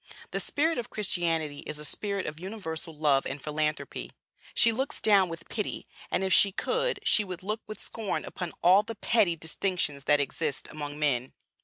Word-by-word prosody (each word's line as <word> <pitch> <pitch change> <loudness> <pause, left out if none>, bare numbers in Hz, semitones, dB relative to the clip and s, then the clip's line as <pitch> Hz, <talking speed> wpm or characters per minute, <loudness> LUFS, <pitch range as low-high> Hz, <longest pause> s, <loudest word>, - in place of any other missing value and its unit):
The - - -1
spirit 320 0 +1
of 235 - -5
Christianity 165 -7 -1
is 150 - -4
a 150 - -6
spirit 200 +4 -2
of 150 +1 -5
universal 180 -4 -5
love 145 -3 +3
and 135 +2 -4
philanthropy. 150 +1 -2 0.4
She 230 - +6
looks 265 +5 -2
down 200 -4 +5
with 165 0 -8
pity, 210 -2 -3 0.2
and, 190 - +1
if 190 -1 +3
she 200 - +7
could, 475 - 0
she 215 - +4
would 185 -2 -7
look 215 +3 -2
with 215 - -7
scorn 220 -4 -3
upon 180 -3 -5
all 185 +3 +7
the 225 +2 -7
petty 205 -4 +3
distinctions 160 -3 0
that 145 0 +5
exist 145 +1 -1
among 145 -1 -5
men. 135 -4 0
175 Hz, 180 wpm, -29 LUFS, 150-210 Hz, 0.4 s, she